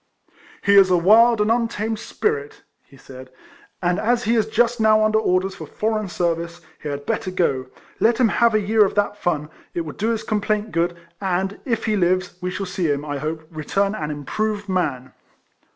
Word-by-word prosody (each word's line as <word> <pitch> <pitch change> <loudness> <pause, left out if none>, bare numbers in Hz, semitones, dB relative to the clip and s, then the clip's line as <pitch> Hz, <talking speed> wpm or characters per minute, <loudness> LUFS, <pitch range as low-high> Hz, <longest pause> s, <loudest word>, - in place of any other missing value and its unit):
" - - -25
He 200 0 +5
is 195 -1 +7
a 180 - +4
wild 220 +5 +5
and 210 +2 +2
untamed 225 -2 -1
spirit," 145 -7 -3 0.2
he 135 - -19
said; 130 -1 -12 0.3
" - - -23
and 175 +1 +1
as 240 +2 +1
he 225 - +1
is 220 -2 +2
just 235 +1 +1
now 215 0 +5
under 215 0 +3
orders 190 -2 +1
for - - -9
foreign 215 -2 -2
service, 170 0 -2 0.2
he 150 - -5
had 145 0 -5
better 185 - -2
go; 135 -8 0 0.3
let 230 +1 +3
him 245 -3 +3
have 235 +1 +3
a - - +4
year 215 +1 +3
of 195 - -1
that 205 0 +1
fun; 160 -6 -2 0.2
it 170 - 0
will 155 -2 -6
do 220 +3 -1
his 225 -1 -1
com 215 -1 -1
plaint 215 +1 -1
good; 170 +1 0 0.2
and, 190 +1 -1
if 230 -5 -1
he 215 -1 +1
lives, 185 -1 +1
we 180 - -2
shall 195 +2 -4
see 180 -2 -2
liim, 145 0 -1
I 145 -1 -3
hope, 155 +2 -4
return 195 +6 -1
an 155 -8 -4
improved 205 +8 -3
man." 145 -9 -2
195 Hz, 210 wpm, -22 LUFS, 170-215 Hz, 0.3 s, is